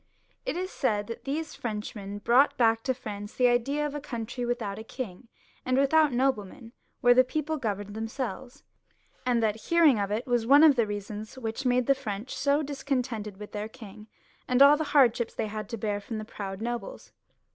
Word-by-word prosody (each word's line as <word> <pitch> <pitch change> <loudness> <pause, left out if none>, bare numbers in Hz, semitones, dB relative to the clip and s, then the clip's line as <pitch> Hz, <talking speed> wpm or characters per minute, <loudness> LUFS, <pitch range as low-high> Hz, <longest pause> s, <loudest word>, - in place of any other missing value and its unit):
It 345 - -1
is 370 +1 -3
said 210 -5 0
that 230 +2 -8
these 305 +3 -3
Frenchmen 210 -2 -5
brought 245 +7 +3
back 225 -2 +3
to 260 - +2
France 205 -4 -7
the 250 - +2
idea 275 +5 +1
of 295 - -3
a 295 - -3
country 240 -2 -5
without 220 -4 -3
a - - -7
king 230 -2 -7 0.4
and 255 0 +1
without 295 +2 +4
noble 250 -3 +1
men, 225 +4 -13 0.3
where 245 0 +6
the 255 +1 +6
people 310 +4 -2
governed 205 -5 -3
themselves; 245 +3 -5 0.6
and 240 -2 +2
that 215 -1 +1
hearing 325 -9 +5
of 200 -1 -1
it 215 +4 -2
was 240 -2 0
one 285 +4 +7
of 305 -3 +7
the 230 -3 +2
reasons 205 +3 -6
which 230 +2 -3
made 250 0 +2
the 275 - +5
French 230 -3 -5
so 285 +2 +1
discontented 255 -7 -3
with 210 0 -9
their 210 +1 -4
king 215 -3 -12 0.4
and 250 +2 +6
all 285 +1 +8
the 315 +1 -2
hardships 250 -5 +3
they - - -1
had 215 -1 -6
to 230 - -4
bear 205 -1 -2
from 220 +2 -6
the 215 - -5
proud 195 -2 -6
nobles. 235 -2 -5
240 Hz, 200 wpm, -28 LUFS, 210-270 Hz, 0.6 s, all